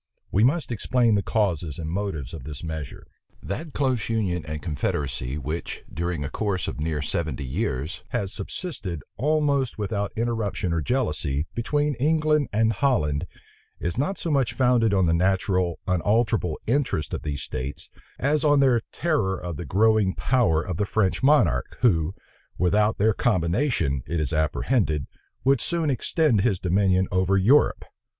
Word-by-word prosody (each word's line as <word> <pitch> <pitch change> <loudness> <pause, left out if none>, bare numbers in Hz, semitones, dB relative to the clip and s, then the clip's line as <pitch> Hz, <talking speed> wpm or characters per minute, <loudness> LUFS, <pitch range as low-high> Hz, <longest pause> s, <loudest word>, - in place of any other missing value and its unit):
We 100 - +3
must 145 +3 +2
explain 120 0 +2
the 100 - +3
causes 90 -8 -1
and 80 - -5
motives 85 -7 -3
of - - -7
this 75 +1 -7
measure. 80 -4 -6 0.4
That 150 - -5
close 130 -6 0
union 95 -7 0
and 75 0 -4
confederacy 70 -4 -2
which, 75 +4 -5
during 85 -2 -2
a 70 - -3
course 100 -4 -1
of - - -5
near 75 -1 -1
seventy 75 -1 -2
years, 70 - -3
has 95 -1 -2
subsisted, 100 - -5
almost 140 -1 +1
without 100 -1 -2
interruption 110 -6 -1
or 85 - 0
jealousy, 75 - -1
between 145 +5 0
England 150 0 +2
and 110 +2 +2
Holland, 95 - +1 0.5
is 85 - -2
not 150 +10 -1
so 165 - -2
much 135 -5 +1
founded 120 -3 +3
on 95 -2 +3
the 80 - +2
natural, 90 0 +1
unalterable 100 -1 +1
interests 120 - 0
of - - -2
these 70 -2 -4
states, 65 +3 -6 0.3
as 145 +2 +1
on 145 -2 +4
their 130 -4 +4
terror 110 - 0
of 90 -2 -5
the 85 - -6
growing 105 +2 +3
power 100 -11 +2
of 90 -3 -4
the 105 - 0
French 100 -4 +1
monarch, 115 - +3
who, 90 -8 +2 0.4
without 105 +4 +2
their 110 +2 +3
combination, 90 - +1
it 85 - -1
is 75 -4 -1
apprehended, 80 - +1 0.4
would 135 -2 +3
soon 165 -4 0
extend 130 - +2
his 105 -3 +2
dominion 95 +1 +2
over 95 +1 +2
Europe. 125 +10 +4
100 Hz, 155 wpm, -25 LUFS, 80-125 Hz, 0.5 s, on